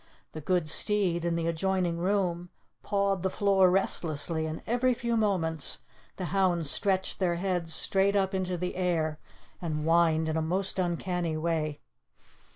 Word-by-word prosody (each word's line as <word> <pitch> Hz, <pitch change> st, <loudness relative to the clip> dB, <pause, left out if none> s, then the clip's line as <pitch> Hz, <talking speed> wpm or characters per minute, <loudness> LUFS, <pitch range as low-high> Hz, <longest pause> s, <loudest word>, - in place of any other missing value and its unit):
The 155 Hz, -, -7 dB
good 175 Hz, +1 st, 0 dB
steed, 180 Hz, 0 st, +1 dB
in 170 Hz, -1 st, +1 dB
the 165 Hz, -1 st, -1 dB
adjoining 170 Hz, +1 st, 0 dB
room, 180 Hz, -2 st, 0 dB, 0.3 s
pawed 200 Hz, -2 st, 0 dB
the 190 Hz, -, 0 dB
floor 195 Hz, -1 st, +3 dB
restlessly, 160 Hz, -4 st, 0 dB
and 155 Hz, 0 st, -6 dB
every 245 Hz, +2 st, +2 dB
few 235 Hz, 0 st, -1 dB
moments 175 Hz, -8 st, -1 dB, 0.4 s
the 185 Hz, -, -4 dB
hounds 175 Hz, -6 st, +2 dB
stretched 190 Hz, -2 st, 0 dB
their 175 Hz, -3 st, +1 dB
heads 175 Hz, -2 st, -2 dB
straight 195 Hz, +1 st, +2 dB
up 195 Hz, -1 st, +1 dB
into 185 Hz, -1 st, -1 dB
the 180 Hz, +1 st, -3 dB
air, 160 Hz, -4 st, 0 dB, 0.4 s
and 155 Hz, -3 st, -2 dB
whined 165 Hz, -1 st, +3 dB
in 160 Hz, -, -1 dB
a -, -, +1 dB
most 185 Hz, +4 st, -1 dB
uncanny 175 Hz, -2 st, -1 dB
way. 155 Hz, -2 st, -1 dB
180 Hz, 155 wpm, -29 LUFS, 165-190 Hz, 0.4 s, floor